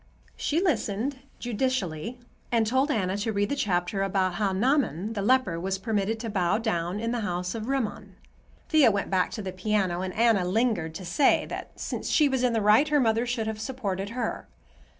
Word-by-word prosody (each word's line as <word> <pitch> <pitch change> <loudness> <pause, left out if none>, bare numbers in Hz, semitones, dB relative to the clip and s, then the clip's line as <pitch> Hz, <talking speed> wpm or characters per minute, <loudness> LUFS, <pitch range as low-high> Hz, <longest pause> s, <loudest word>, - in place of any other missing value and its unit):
She 305 - 0
listened 265 - 0 0.2
judicially 235 -5 -2 0.3
and 230 -2 +3
told 260 +6 +1
Anna 190 -8 0
to 210 +2 -1
read 205 0 0
the - - 0
chapter 190 -5 0
about 190 -1 +1
how 200 0 0
Naaman 220 - +1
the 205 - -2
leper 210 -6 +2
was 190 +2 -2
permitted 215 +1 -1
to 230 - -4
bow 180 -1 +1
down 185 -4 -1
in 230 +1 -2
the 240 - -1
house 180 -3 -2
of 225 0 -5
Rimmon. 265 -5 -3 0.5
Thea 310 -6 +6
went 200 -2 -2
back 185 -1 +2
to 215 - -5
the 190 - -4
piano, 185 -2 0
and 185 0 -3
Anna 225 -4 +3
lingered 185 -4 0
to 185 - -6
say 220 +11 +3
that, - - -7
since - - -4
she 300 - +4
was 265 -2 0
in 245 -2 +2
the 225 - +1
right, 210 +8 +5
her 295 -1 +3
mother 230 -1 +2
should 235 -2 -1
have 220 -1 -4
supported 205 -6 -3
her. 235 -3 -3
215 Hz, 195 wpm, -27 LUFS, 190-245 Hz, 0.5 s, Thea